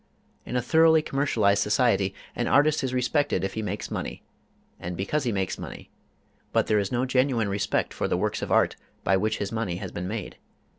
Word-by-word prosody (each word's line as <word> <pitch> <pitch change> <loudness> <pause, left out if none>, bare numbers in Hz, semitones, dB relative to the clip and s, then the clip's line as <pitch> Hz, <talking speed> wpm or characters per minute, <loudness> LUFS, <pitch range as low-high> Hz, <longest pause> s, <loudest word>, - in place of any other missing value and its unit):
In 125 - -4
a 125 - +1
thoroughly 160 +2 +5
commercialized 110 -9 +2
society, 105 -3 +2 0.2
an 120 - -1
artist 150 +1 +3
is 130 - -1
respected 125 - +1
if 95 - -2
he 110 - -3
makes 105 - -4
money, - - -4 0.6
and 90 0 -5
because 135 +9 -1
he 120 - +1
makes 95 -3 -2
money, - - -9 0.6
but - - +2
there 105 - +2
is 100 -1 -2
no 125 +1 +1
genuine 125 -4 +1
respect 100 0 -1
for - - -1
the - - 0
works - - -1
of - - -4
art - - +3 0.3
by 95 - +3
which 110 +3 0
his 100 - -3
money 110 -6 -2
has 95 0 -6
been 90 +1 -4
made. 105 +2 -5
110 Hz, 200 wpm, -26 LUFS, 100-130 Hz, 0.6 s, thoroughly